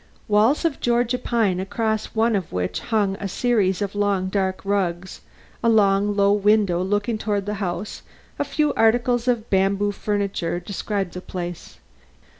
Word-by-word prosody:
Walls 220 +9 +3
of 320 -4 0
Georgia 240 +1 +1
pine 220 -7 0
across 220 +3 -2
one 225 0 +2
of 190 -5 -3
which 90 0 -2
hung 205 -4 0
a 200 - -4
series 200 -3 +1
of 200 - -4
long 200 -2 0
dark 190 -1 -2
rugs; 190 -2 -2 0.4
a 230 - +4
long, 205 -2 +3
low 200 0 +4
window 205 -3 +2
looking 205 +4 -1
toward 205 -2 -1
the 210 - -2
house, 180 +2 -4 0.4
a - - +2
few 295 +1 0
articles 240 +2 +2
of 235 -2 0
bamboo 195 +1 +2
furniture 200 -4 -2
describe 195 0 -3
the 180 - -7
place. 175 -2 -7
205 Hz, 155 wpm, -22 LUFS, 190-225 Hz, 0.4 s, a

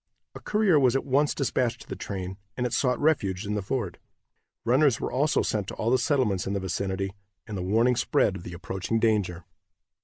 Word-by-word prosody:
A - - -8
courier 210 -7 +3
was 130 -2 +3
at 135 - 0
once 140 +2 +2
dispatched 120 -3 0
to - - -13
the - - -5
train, 95 -1 -5 0.2
and 125 - 0
it 125 - -2
sought 125 -2 +1
refuge 105 -13 +1
in 105 - -2
the 105 - -1
fort. 100 -3 -3 0.7
Runners 130 +1 +4
were - - -3
also 145 +4 +2
sent 105 -3 -1
to - - -6
all 115 - 0
the 130 - +4
settlements 125 - +1
in 100 - -1
the 100 - 0
vicinity, 95 +1 -2 0.3
and 105 - -6
the 95 - -3
warning 115 +7 +3
spread 105 -4 +2
of - - -9
the 85 - -8
approaching 95 +5 -2
danger. 100 -7 +1
110 Hz, 210 wpm, -27 LUFS, 95-130 Hz, 0.7 s, Runners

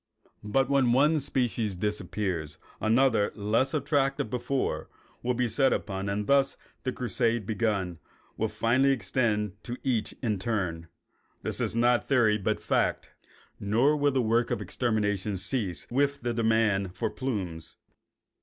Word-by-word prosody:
But 125 +6 +1
when 135 -3 +3
one 150 +5 +4
species 120 -7 -1
disappears 95 -5 -3 0.2
another, 115 -1 +3
less 110 +5 +1
attractive 140 -5 0
before, 125 +2 -2 0.3
will 125 0 0
be 125 0 +1
set 135 +4 +2
upon, 95 -1 -2
and 105 +1 -1
thus 140 +2 +3 0.2
the 130 - -2
crusade, 120 -1 0
once - - -14
begun, 100 -6 -1 0.4
will 110 - 0
finally 120 +6 +2
extend 105 -3 -1
to 120 +1 -5
each 120 -5 -1
in 105 -5 0
turn. 90 -6 -2 0.6
This - - -2
is - - -1
not 120 +1 +3
theory 110 -6 +3
but 100 - -1
fact. - - 0 0.5
Nor 120 +9 +3
will 145 -1 +2
the 130 -2 +1
work 115 +2 +2
of 120 - -1
extermination 105 -2 -1
cease 95 - -2
with 140 +2 +1
the 120 0 -1
demand 110 -5 +1
for - - -2
plumes. 95 - -4
115 Hz, 145 wpm, -28 LUFS, 105-130 Hz, 0.6 s, one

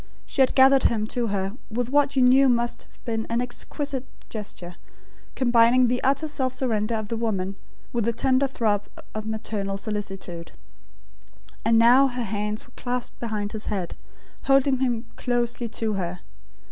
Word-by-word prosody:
She 275 - 0
had 260 - +3
gathered 265 0 +6
him 215 -2 +2
to 240 -2 -1
her 195 0 -2
with 240 +2 -2
what 285 0 +3
you 260 - +4
knew 260 +2 +6
must 240 -1 0
have - - -26
been 225 -1 -2
an 230 +1 0
exquisite 265 +2 -4 0.2
gesture, 180 -5 -7 0.6
combining 240 0 +5
the 245 +1 0
utter 275 +4 +2
self 260 -4 -2
surrender 225 -3 0
of 215 -1 -4
the 230 - -2
woman, 200 -4 -1 0.4
with 235 -3 0
the 235 - +2
tender 260 +3 +2
throb 215 -6 0 0.3
of 215 0 -5
maternal 210 -3 -3
solicitude; 195 -5 -5 1.1
and 225 0 +4
now 245 +4 +7
her 250 -1 -3
hands 210 0 -3
were 240 - -22
clasped 250 -1 -4
behind 210 -3 -3
his 215 -1 -5
head, 190 -5 -3 0.5
holding 270 -1 +4
him 245 -3 0
closely 240 -1 -1
to 220 -1 -2
her. 180 -2 -3
235 Hz, 160 wpm, -25 LUFS, 210-255 Hz, 1.1 s, now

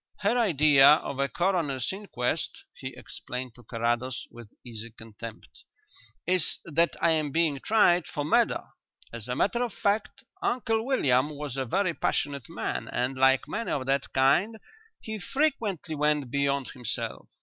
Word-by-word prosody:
Her 210 +3 +2
idea 150 - +6
of 140 -3 -2
a 140 0 +1
coroner's 165 -4 0
inquest," 190 -12 -3
he - - -8
explained 125 -1 -6
to 120 - -15
Carrados, 120 +2 -2
with 120 -3 -12
easy 115 -1 -6
contempt, 115 0 -11 0.6
"is 180 -2 +2
that 165 +1 +2
I 170 - +5
am 155 -2 +1
being 160 -3 +1
tried 180 -3 +3
for 145 - -3
murder. - - +2 0.5
As 115 -1 -6
a 125 - -2
matter 235 - +1
of 240 -4 -2
fact, 205 +2 -1 0.2
Uncle 225 - 0
William 135 - +3
was 150 -3 -6
a 135 -1 -1
very 185 +7 +1
passionate 140 -5 -2
man, - - -3
and, 125 +2 -1
like 135 0 +3
many 230 +1 -3
of 135 -3 -1
that 135 +1 0
kind, 140 +12 +3 0.4
he 220 -1 -5
frequently 210 - -1
went 150 -3 0
beyond 140 -1 0
himself. 125 -3 -5
145 Hz, 150 wpm, -27 LUFS, 130-190 Hz, 0.6 s, idea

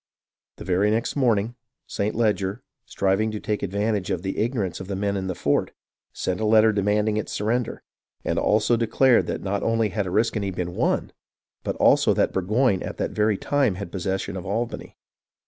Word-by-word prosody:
The - - -9
very 95 +3 +2
next 115 +2 0
morning 115 -5 +2 0.3
St. 105 +2 -2
Leger, 105 0 0 0.2
striving 100 +3 +1
to 110 -1 -4
take 105 0 -2
advantage 100 0 -1
of 90 - -2
the 95 - -2
igno 115 +1 -1
rance 95 -3 -3
of 95 - -7
the 100 - -3
men 100 +1 -1
in 95 -1 -2
the 95 - -3
fort, 70 -3 0 0.4
sent 90 +1 -3
a 110 - 0
letter 110 0 +5
demanding 105 +1 +1
its 110 - -3
surrender, 115 +3 -1 0.4
and - - 0
also 110 +2 +3
declared 120 +2 +3
that - - -3
not 100 +1 -1
only 115 -1 +1
had 100 -2 -2
Oriskany 105 +1 0
been 90 -1 -4
won, - - 0 0.5
but - - -2
also - - +4
that - - +1
Burgoyne 100 +2 +1
at - - -5
that - - -2
very 105 -1 +1
time 135 -7 +1
had 95 -2 -6
possession 95 +1 -3
of 95 - -5
Albany. 115 +5 -4
105 Hz, 185 wpm, -24 LUFS, 95-110 Hz, 0.5 s, letter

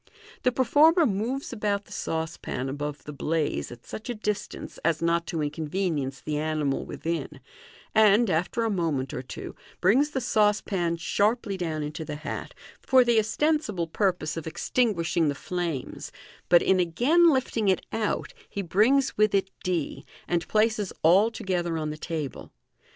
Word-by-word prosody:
The 250 - +3
performer 300 +7 +5
moves 240 +6 -2
about 205 -3 -1
the - - -19
saucepan 160 -5 -3
above 145 +1 -4
the 150 - -8
blaze 155 +1 -1
at 120 -1 -12
such 220 +3 -8
a 245 - -2
distance 210 -1 -4
as 165 -2 +2
not 170 0 +1
to 165 -4 -2
inconvenience 150 -2 -2
the 150 -1 -2
animal 155 -3 -1
within, 165 +1 -4 0.5
and, 220 +2 +5
after 180 +7 0
a 225 - 0
moment 155 -9 -1
or - - -3
two, 130 - -8 0.2
brings 250 +11 +4
the 275 - -2
saucepan 210 -7 +1
sharply 205 +4 0
down 160 -4 -3
into 155 +2 -5
the 150 -1 -5
hat, 155 +1 -6 0.3
for 260 -1 +5
the 235 -2 +4
ostensible 220 - 0
purpose 175 -2 -1
of 165 - -5
extinguishing 170 -4 +1
the 145 - 0
flames, 170 -4 -4 0.4
but 175 -1 +6
in 190 -1 +3
again 250 - +4
lifting 255 -6 0
it 190 - +2
out 225 - -1 0.2
he 200 - -4
brings 230 +10 +3
with 215 -1 +4
it 195 -1 +1
d, 175 -5 -2 0.2
and 170 -2 0
places 215 -2 +1
all 190 +7 +6
together 175 -6 -2
on 155 -1 -2
the - - -5
table. 155 -4 -5
185 Hz, 155 wpm, -26 LUFS, 160-220 Hz, 0.5 s, but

